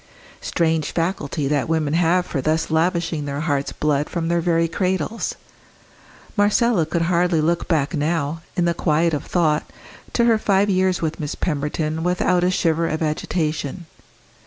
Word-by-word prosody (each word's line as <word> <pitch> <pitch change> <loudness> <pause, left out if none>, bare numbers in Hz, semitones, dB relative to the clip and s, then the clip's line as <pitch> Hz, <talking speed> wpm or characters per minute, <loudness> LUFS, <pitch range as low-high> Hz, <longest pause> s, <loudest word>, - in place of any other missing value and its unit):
Strange 160 -3 0
faculty 165 -4 -1
that 145 0 0
women 155 -3 0
have 175 +2 +2
for 140 - -3
thus 155 +3 0
lavishing 165 -2 0
their 140 0 -3
heart's 145 -4 -1
blood 150 -1 0
from 170 -1 -2
their 170 0 +2
very 165 -1 +2
cradles! 185 +4 -2 1.0
Marcella 205 -3 +3
could 165 +1 0
hardly 175 -1 +2
look 170 +2 0
back 155 -2 +1
now, 155 0 -1 0.2
in 175 - +2
the 170 - +2
quiet 165 0 +1
of 150 - -1
thought, 155 -4 +1 0.5
to 235 - +2
her 230 -2 +4
five 200 -1 +2
years 185 -1 +1
with 160 -1 -2
Miss 150 -2 -3
Pemberton 155 +1 -2
without 180 +1 +1
a 180 - +3
shiver 165 -2 +1
of 155 +1 -2
agitation. 155 +1 -2
165 Hz, 160 wpm, -21 LUFS, 155-180 Hz, 1.0 s, her